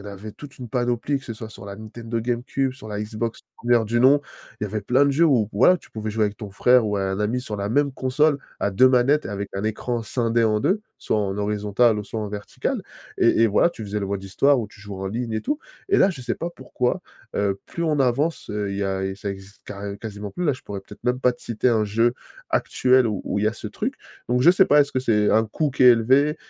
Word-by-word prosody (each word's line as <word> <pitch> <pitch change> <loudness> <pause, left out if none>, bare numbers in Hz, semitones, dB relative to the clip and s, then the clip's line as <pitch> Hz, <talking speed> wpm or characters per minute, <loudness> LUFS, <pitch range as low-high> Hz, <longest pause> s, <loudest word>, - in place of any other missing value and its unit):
en - - -15
avait 100 +1 -8
toute 145 -2 -12
une 125 -2 -7
panoplie, 125 +3 0
que - - -17
ce 115 - -5
soit 110 0 -8
sur 100 - -12
la 100 0 -7
Nintendo 115 +2 -5
Game 120 +1 -1
Cube, 135 0 -1
sur 130 -4 -11
la 105 -1 -4
Xbox 110 +2 -4 0.2
1re 120 -1 +2
du 120 +2 +1
nom. 140 +3 +6 0.4
Il - - -1
y - - -1
avait 105 +1 -3
plein 130 +6 +3
de - - +3
jeux 165 +5 +4
où 120 -9 +3
voilà, 130 - +5
tu - - -20
pouvais 110 -1 -4
jouer 110 0 +1
avec 105 0 -2
ton 105 -2 -8
frère 125 +4 +4
ou 105 -1 -1
un 95 0 -1
ami 115 +4 0
sur 105 -4 -5
la 100 0 -3
même 140 +2 +2
console 140 +3 +2 0.2
à 100 - 0
2 130 +7 +6
manettes, 135 +4 +3
avec 100 0 -4
un 100 - -3
écran 115 +2 -2
scindé 115 0 0
en 110 -1 +2
2, 195 - +1 0.2
soit - - -1
en 100 0 -2
horizontal 105 +2 +2
ou 105 - -7
soit 110 - -5
en 105 - -3
vertical. 105 0 -4 0.3
Et 115 - +4
et, - - +6
voilà, 110 +11 +3
tu 110 - -8
faisais 105 +1 -3
le 100 - -2
mode 100 0 -3
histoire 135 +8 +3
où 110 - -2
tu 105 0 -18
jouais 100 -1 -8
en - - -2
ligne, 115 +3 -3
et - - -1
tout. 295 +3 -2 0.3
Et 395 - +3
là, 195 - +5
je 145 -8 -8
sais 120 -2 -2
pas 170 - -4
pourquoi, 125 -5 -2 0.4
heu, 100 -1 0
plus 170 - -4
on 150 -3 +1
avance, 135 +6 0
heu, 105 -1 -2
il - - -4
y - - -1
a 95 0 -1
et 95 0 -3
ça 100 0 -5
existe 95 +1 -11
carré 100 0 -6
quasiment 105 -2 -7
plus, 180 - -3
là, 145 - +3
je 130 - -9
pourrais 100 -1 -6
peut-être 105 +4 -15
même 125 +1 0
pas 125 - +4
te - - -19
citer 115 +2 0
un 110 -2 +2
jeu 115 +4 +2 0.4
actuel 130 -1 +3
où 105 -3 -2
où - - -1
il 105 - 0
y - - +4
a - - -2
ce 110 - -7
truc, 240 - -3 0.3
donc 125 +1 +2
je 170 - +8
sais 190 +1 +5
pas, 145 0 +5
est-ce 145 - +2
que 130 - -1
c'est 105 -5 +2
un 110 +1 +4
coût 145 +7 -1
qui 130 -1 +2
est 125 - +10
élevé? 135 +7 +3
115 Hz, 275 wpm, -23 LUFS, 105-130 Hz, 0.4 s, est